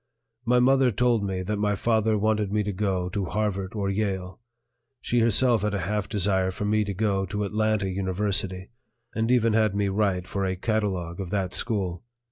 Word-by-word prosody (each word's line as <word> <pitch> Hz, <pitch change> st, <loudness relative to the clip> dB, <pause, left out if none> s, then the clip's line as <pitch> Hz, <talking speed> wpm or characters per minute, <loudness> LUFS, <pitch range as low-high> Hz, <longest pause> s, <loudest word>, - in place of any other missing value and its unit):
My 125 Hz, +2 st, +3 dB
mother 130 Hz, +1 st, +4 dB
told 120 Hz, -1 st, +1 dB
me 95 Hz, -2 st, -2 dB
that 105 Hz, +3 st, -2 dB
my 105 Hz, 0 st, +1 dB
father 110 Hz, 0 st, +1 dB
wanted 105 Hz, -1 st, 0 dB
me 105 Hz, 0 st, +1 dB
to 105 Hz, 0 st, -3 dB
go 95 Hz, -2 st, -1 dB
to 100 Hz, +1 st, -2 dB
Harvard 100 Hz, 0 st, -2 dB
or 100 Hz, -2 st, -1 dB
Yale; 95 Hz, -2 st, -2 dB, 0.6 s
she 120 Hz, -, 0 dB
herself 115 Hz, 0 st, +4 dB
had 105 Hz, 0 st, -1 dB
a 100 Hz, -, -2 dB
half 105 Hz, +3 st, -2 dB
desire 95 Hz, -2 st, +1 dB
for 95 Hz, +2 st, -4 dB
me 105 Hz, +1 st, +2 dB
to 100 Hz, -1 st, -4 dB
go 100 Hz, -1 st, 0 dB
to 105 Hz, +3 st, -3 dB
Atlanta 110 Hz, 0 st, 0 dB
University, 95 Hz, 0 st, -2 dB, 0.4 s
and 115 Hz, +1 st, -1 dB
even 115 Hz, -3 st, +3 dB
had 110 Hz, -2 st, +2 dB
me 100 Hz, -1 st, +1 dB
write 95 Hz, -3 st, 0 dB
for 100 Hz, +2 st, -3 dB
a 95 Hz, -1 st, -1 dB
catalogue 95 Hz, -4 st, -2 dB
of 95 Hz, -3 st, -4 dB
that 95 Hz, -2 st, -2 dB
school. 95 Hz, -7 st, -1 dB
100 Hz, 190 wpm, -26 LUFS, 95-110 Hz, 0.6 s, mother